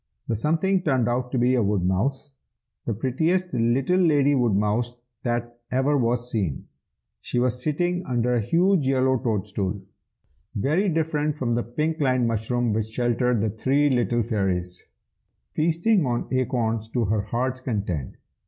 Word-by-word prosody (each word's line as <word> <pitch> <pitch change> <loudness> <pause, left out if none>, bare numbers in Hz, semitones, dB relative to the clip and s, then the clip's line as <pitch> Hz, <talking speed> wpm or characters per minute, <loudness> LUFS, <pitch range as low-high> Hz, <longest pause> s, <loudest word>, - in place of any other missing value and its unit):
The 115 - 0
something 165 - +1
turned 130 -8 +1
out 125 +1 -1
to 130 - -1
be 125 +1 +3
a 125 - +3
woodmouse, 105 +8 0 0.5
the 115 - +1
prettiest 160 - 0
little 125 +9 +2
lady 145 -5 +4
woodmouse 115 -1 +1 0.3
that 120 -1 -3
ever 135 +3 +1
was 120 -1 0
seen. 95 -11 -2 0.6
She - - -3
was 125 0 +1
sitting 175 +5 0
under 125 -1 +1
a 120 - +2
huge 170 - +2
yellow 130 -1 +2
toadstool, 100 -3 -2 0.8
(very 160 - +1
different 155 -2 0
from 125 -4 -1
the 120 - +1
pink 155 +7 -2
lined 130 -4 +2
mushroom 115 +1 0
which 110 0 0
sheltered 120 0 0
the 110 -1 0
three 135 +6 +1
little 120 -1 +1
fairies,) 95 -5 -2 0.7
feasting 170 +5 +2
on 120 -1 -1
acorns 120 -4 -1
to 120 -3 +1
her 105 +1 +1
heart's 125 +4 -2
content. 100 - -3
125 Hz, 145 wpm, -24 LUFS, 110-145 Hz, 0.8 s, lady